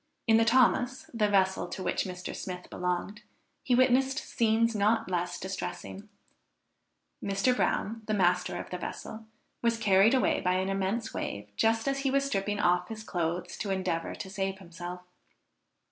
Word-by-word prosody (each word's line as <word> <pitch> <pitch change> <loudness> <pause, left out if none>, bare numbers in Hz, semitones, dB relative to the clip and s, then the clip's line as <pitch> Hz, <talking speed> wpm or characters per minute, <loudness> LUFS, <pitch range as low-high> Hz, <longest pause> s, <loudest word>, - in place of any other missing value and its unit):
In 225 -1 +5
the 225 - +4
Thomas, 255 +4 +3
the 215 -3 +2
vessel 190 -2 +2
to 190 - -6
which - - 0
Mr. 180 -1 -6
Smith 180 -1 -7
belonged, 180 +4 -2 0.4
he 250 - +2
witnessed 260 +2 +3
scenes 230 -6 +1
not 215 0 +2
less 175 0 -1
distressing. 195 +2 -6 1.1
Mr. 200 +6 +2
Brown, 225 -2 0
the 215 - +1
master 180 -2 +2
of - - -8
the 180 - -4
vessel, 220 +4 -7 0.3
was 235 -1 +2
carried 210 +2 +5
away 260 - +2
by 180 - +2
an 185 +1 0
immense 195 +4 -1
wave 100 0 -5
just 225 - +2
as 275 0 +1
he 275 0 0
was 275 +1 +2
stripping 205 -4 -1
off 180 -1 +2
his 220 -1 -7
clothes 175 -2 -2
to 205 - -3
endeavor 185 -3 -1
to - - -6
save 195 -1 -2
himself. 180 -1 -8
200 Hz, 160 wpm, -29 LUFS, 180-230 Hz, 1.1 s, In